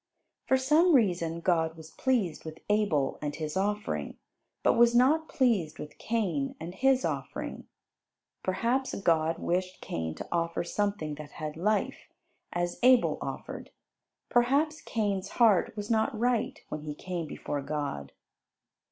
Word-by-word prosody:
For 265 - +4
some 305 +6 +4
reason 170 -8 +1
God 165 -2 +1
was 160 0 -11
pleased 235 -11 0
with 160 0 -8
Abel 200 -10 +1
and 145 -1 -3
his 155 0 -4
offering, 195 - -2 0.5
but - - +5
was 235 0 +5
not 300 +6 +4
pleased 215 - +1
with 150 - -9
Cain 185 -12 -1
and 165 +2 -6
his 265 +5 +3
offering. - - -4 0.7
Perhaps 240 +7 0
God 165 -3 +2
wished 185 +1 -2
Cain 80 -1 -4
to - - -7
offer 170 0 0
something 200 -4 -1
that 150 -1 -12
had 155 -2 -5
life, 210 +6 -1 0.4
as 175 0 -2
Abel 250 0 +5
offered; - - -6 0.6
perhaps 280 +6 +2
Cain's 200 -4 -1
heart 215 -4 +3
was 205 +2 -4
not 220 +2 +1
right 240 0 0
when 155 - -4
he 150 -1 -6
came 175 -1 -4
before 145 -1 -4
God. 140 - -4
185 Hz, 140 wpm, -29 LUFS, 160-235 Hz, 0.7 s, but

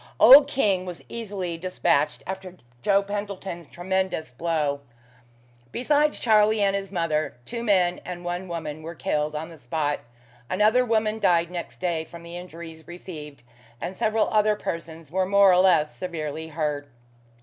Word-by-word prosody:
Old 275 +3 +10
King 200 -8 +1
was 180 -2 -8
easily 195 -7 -4
despatched 170 -5 +1
after 190 -1 -7 0.2
Joe 200 +7 +3
Pentland's 200 -4 -5
tremendous 185 -5 -2
blow. 150 0 -1 0.9
Besides 295 +4 +2
Charlie 215 -1 +4
and 200 -1 +3
his 195 -1 -4
mother, 165 -4 -1
two 235 -1 -5
men 185 -5 +2
and 175 -1 -7
one 175 +2 -3
woman 155 -3 -5
were 165 +2 -7
killed 150 +2 -1
on 160 +2 -4
the 165 - -12
spot: 145 +3 -2 0.5
another 215 +6 +4
woman 220 -2 +1
died 170 -3 +3
next 175 -1 -6
day 170 -3 -1
from 170 +1 -12
the 170 +1 -9
injuries 165 -2 -9
received, 155 -6 -9 0.4
and 175 +7 -5
several 220 +2 +1
other 215 -1 +3
persons 165 -4 -6
were 185 +1 +1
more 200 0 +6
or 180 - +5
less 180 -5 +4
severely 160 -3 -5
hurt. 150 -2 -2
180 Hz, 150 wpm, -25 LUFS, 160-200 Hz, 0.9 s, Old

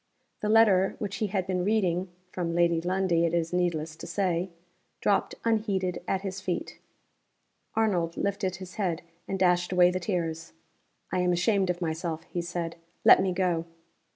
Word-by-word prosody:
The 210 - -1
letter 210 -4 +5
which 205 -2 -4
he 215 - 0
had 190 -2 -1
been 185 -1 -1
reading 185 -3 +1 0.2
(from 170 -2 -2
Lady 170 -1 +3
Lundie, 180 -1 +1
it 170 0 +1
is 165 0 -1
needless 165 -3 0
to - - -8
say), 185 -2 0 0.5
dropped - - +1
unheeded 200 -5 0
at 190 - 0
his 195 -1 -5
feet. 185 -2 -4 1.0
Arnold 180 -7 +1
lifted 195 -2 -1
his 185 0 -10
head, 180 -5 -1 0.2
and 195 - -2
dashed 180 -1 +2
away 180 -1 +5
the 185 - -2
tears. 165 -4 -3 0.6
"I 185 - 0
am 180 0 +2
ashamed 190 +2 +2
of 180 0 -1
myself," 160 0 -3
he 175 0 -4
said. 170 -1 -4 0.3
"Let - - +8
me 190 -1 +1
go." 175 -2 0
180 Hz, 165 wpm, -28 LUFS, 170-190 Hz, 1.0 s, Let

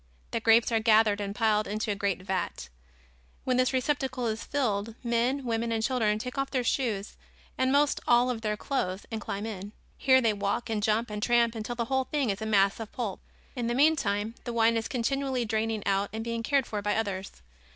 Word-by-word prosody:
The - - 0
grapes 225 +1 +4
are 225 - +3
gathered 215 -2 +4
and 200 0 -4
piled 215 -2 +2
into 210 +1 -2
a - - -1
great 195 -2 -1
vat. 185 - -3 0.7
When 255 -1 +1
this 255 0 +3
receptacle 260 -1 -1
is 220 -1 -2
filled, 225 -6 -1
men, 240 +3 0
women 230 0 -1
and 225 -1 0
children 225 -4 +1
take 250 +4 -5
off 275 - -1
their 255 -2 0
shoes 225 -5 -1 0.4
and 260 0 +1
most 285 +1 +3
all 245 +1 +4
of 230 -2 -4
their 210 -1 -1
clothes 205 -8 -2
and 220 -1 -3
climb 200 +1 -4
in. 205 -1 -6 0.3
Here 260 -1 +5
they 225 -4 +2
walk 205 +3 -2
and 215 -2 0
jump 220 +1 +1
and 210 0 -4
tramp 235 0 +3
until 225 +1 -4
the 235 -1 -1
whole 265 +2 0
thing 275 -7 0
is 200 +2 -5
a 220 - -2
mass 200 -1 +3
of 225 -2 -6
pulp. 215 -7 -4 0.4
In 240 -3 -2
the 240 - 0
meantime, 225 -8 +2
the 240 - -4
wine 230 0 +3
is 225 -1 -1
continually 265 0 -1
draining 220 -1 -1
out 200 0 +1
and 220 +1 -4
being 230 0 -3
cared 275 +2 +1
for 210 -3 -4
by 205 0 0
others. 200 -3 -2
225 Hz, 215 wpm, -28 LUFS, 210-250 Hz, 0.7 s, Here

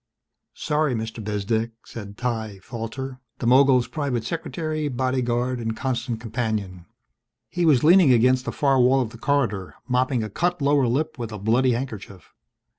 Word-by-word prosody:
_" - - -21
"Sorry, 150 -3 0
Mr. 110 0 -5
Bezdek," 110 +2 -1
said 100 -2 -9
Ty 110 -5 -3
Falter, 125 +3 -6 0.2
the - - -5
mogul's 130 0 +5
private 140 -6 -2
secretary, 155 +1 -3
bodyguard 125 -1 -1
and 115 -1 -3
constant 125 -3 -2
companion. 110 -6 -3 0.6
He 175 -2 0
was 140 -6 +4
leaning 170 -2 +6
against 125 +2 +3
the - - -2
far 135 -2 +2
wall 130 +2 +4
of 115 -3 -3
the 115 - -12
corridor, 115 -10 -1
mopping 125 -1 +1
a 110 - -4
cut 175 - 0
lower 140 -2 +3
lip 135 +3 -1
with 115 -2 -4
a 105 - -5
bloody 120 +5 +2
handkerchief. 105 - -6
125 Hz, 160 wpm, -24 LUFS, 110-135 Hz, 0.6 s, leaning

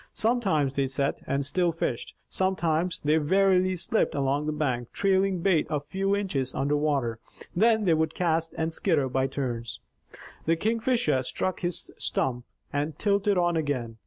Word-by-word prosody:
Sometimes 195 - +1
they 140 -1 0
sat, 140 +1 -1
and 140 0 0
still 175 +5 +1
fished. 145 -7 -3
Sometimes, 175 -2 0
they 150 +2 +3
warily 185 +3 +3
slipped 180 +2 0
along 140 +2 0
the - - +1
bank, 130 -6 -2
trailing 195 -2 +1
bait 175 -4 +2
a 150 -2 0
few 195 +7 -1
inches 145 -11 -2
under 145 +2 +1
water. 140 -7 0 0.4
Then 220 +3 +4
they 175 -4 +3
would 160 0 0
cast 165 -2 0
and 160 0 -1
skitter 160 -7 +1
by 130 +1 +1
turns. 120 -5 -4 0.7
The 165 - +4
Kingfisher 230 - +1
struck 185 +8 -2
his 175 -2 -3
stump, 125 -2 -1 0.3
and 145 +1 -2
tilted 200 -1 +2
on 175 -1 +2
again. 130 -8 -2
160 Hz, 160 wpm, -27 LUFS, 140-190 Hz, 0.7 s, Then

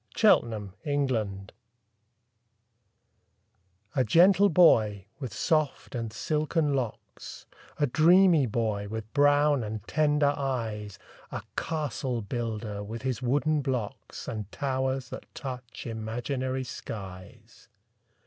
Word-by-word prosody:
THE - - -6
CASTLE 110 - +3 0.3
BUILDER 105 -6 -2 2.5
A 130 - +3
gentle 185 - +5
boy, 110 - +4
with 130 -5 -5
soft 155 -5 0
and 115 -3 -3
silken 150 +3 0
locks 125 -5 -5 0.3
A 145 - +4
dreamy 165 +1 +5
boy, 105 -2 -1
with 110 +1 -6
brown 145 -1 +4
and 110 0 -6
tender 150 -1 +2
eyes, 110 -7 -3 0.3
A - - -5
castle 135 -6 -2
builder, 110 -2 -4
with 115 +4 -7
his 130 -2 -2
wooden 145 +4 +1
blocks, 125 -6 -4
And 105 -3 -5
towers 130 -2 -1
that - - -8
touch 125 -4 -7
imaginary 125 +4 -3
skies. 95 -6 -9
125 Hz, 105 wpm, -28 LUFS, 110-145 Hz, 2.5 s, gentle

